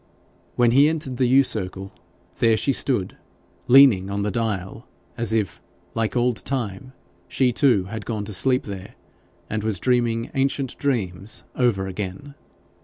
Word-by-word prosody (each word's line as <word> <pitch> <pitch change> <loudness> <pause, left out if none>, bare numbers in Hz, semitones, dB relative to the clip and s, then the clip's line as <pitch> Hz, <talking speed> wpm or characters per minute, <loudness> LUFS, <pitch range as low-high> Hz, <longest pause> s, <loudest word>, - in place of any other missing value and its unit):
When 120 -1 +3
he 140 +5 +5
entered 150 -6 -4
the 130 -1 +2
yew 135 +3 +5
circle, 95 -4 -4 0.4
there 115 -2 +3
she 140 - +1
stood 120 -8 0 0.5
leaning 120 -8 +6
on 100 0 -2
the 105 - -1
dial, 110 -2 -3 0.3
as 115 -2 -1
if, 105 -7 -1 0.3
like 115 0 -2
old 120 -1 +1
Time, 130 -1 -4 0.3
she 125 -2 +1
too 120 -7 +3
had 105 +3 -7
gone 105 -2 -4
to 105 - -6
sleep 130 +6 +2
there, 95 -2 -8 0.5
and 110 0 -3
was 110 -3 0
dreaming 120 -2 0
ancient 135 -1 -1
dreams 105 -8 -2
over 115 -7 +1
again. 95 +8 -6
115 Hz, 150 wpm, -23 LUFS, 100-130 Hz, 0.5 s, leaning